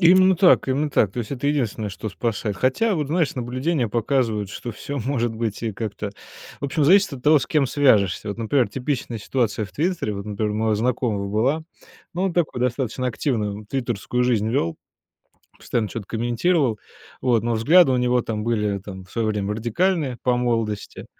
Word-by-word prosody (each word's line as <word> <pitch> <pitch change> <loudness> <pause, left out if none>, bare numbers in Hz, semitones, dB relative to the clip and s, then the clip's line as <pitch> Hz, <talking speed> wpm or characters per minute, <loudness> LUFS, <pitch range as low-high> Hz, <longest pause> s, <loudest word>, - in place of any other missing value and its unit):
Именно 185 +2 +6
так, 180 +1 +5
именно 140 +3 0
так. 105 -8 +2
То 120 - -3
есть 110 - -6
это 140 0 -3
единственное, 120 -7 0
что 100 +2 -6
спасает. 105 -1 -2
Хотя, 165 - +1
вот, 150 -2 -1
знаешь, 160 -1 0
наблюдения 130 +2 -1
показывают, 115 -3 0
что 120 +3 -6
всё 140 +6 -5
может 120 -2 -1
быть 110 -1 -3
и 115 -2 -2
как-то. 105 0 -4 0.5
В - - -5
общем, 145 +2 +1
зависит 190 +3 +5
от 130 -3 -7
того, 150 +2 +6
с 130 - -4
кем 150 -3 +2
свяжешься. 110 -8 +2
Вот, 100 - -4
например, 115 +1 +1
типичная 125 0 -3
ситуация 110 -1 -1
в 95 - -11
"Твиттере". 165 - -1
Вот, 100 0 -6
например, 105 0 -2
у - - -4
моего 110 0 +1
знакомого 110 -3 -1
была. 125 +10 +1 0.5
Ну, 175 - -2
он 190 - 0
такую 165 -7 0
достаточно 125 0 -1
активную 110 -4 -2
твиттерскую 125 0 -1
жизнь 110 -4 +1
вёл. 100 -10 0 0.8
Постоянно 115 -3 -1
чё-то 105 -1 -6
комментировал. 120 - +1 0.4
Вот. 120 -4 +2
Но 120 0 0
взгляды 140 +7 +5
у - - +2
него 125 0 +2
там 110 -2 -3
были 105 -3 0
там 95 -1 -9
в 90 - -20
своё 115 -2 0
время 105 -1 -1
радикальные 130 - 0
по 125 -1 +2
молодости, 115 -4 -2
120 Hz, 185 wpm, -23 LUFS, 105-140 Hz, 0.8 s, Именно